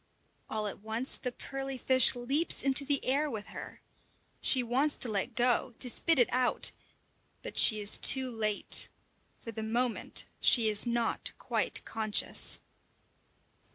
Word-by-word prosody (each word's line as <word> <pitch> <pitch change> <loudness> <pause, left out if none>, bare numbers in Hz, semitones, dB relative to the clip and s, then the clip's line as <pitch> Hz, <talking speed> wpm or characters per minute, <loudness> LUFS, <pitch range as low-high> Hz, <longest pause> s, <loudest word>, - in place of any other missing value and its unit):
All 215 -1 -4
at 205 - -6
once 220 +5 -2
the 250 - -6
pearly 270 +1 -8
fish 260 0 +4
leaps 275 +7 -1
into 275 +1 +4
the 280 0 -1
air 290 +4 -1
with 215 -5 -8
her. - - -11 0.6
She 255 -2 +4
wants 265 +5 -1
to 235 - +1
let 215 +4 -4
go, 245 0 -1
to 255 - -2
spit 330 +6 +1
it 245 - +3
out, 250 0 +2 0.7
but - - -9
she 215 - +5
is 205 0 +1
too 260 -1 +3
late; 215 -3 0 0.5
for 230 - -10
the 220 - -8
moment 230 +2 -1
she 230 -3 +4
is 210 +3 +1
not 235 -1 -2
quite - - -4
conscious. 215 -2 +1
245 Hz, 150 wpm, -29 LUFS, 220-265 Hz, 0.7 s, she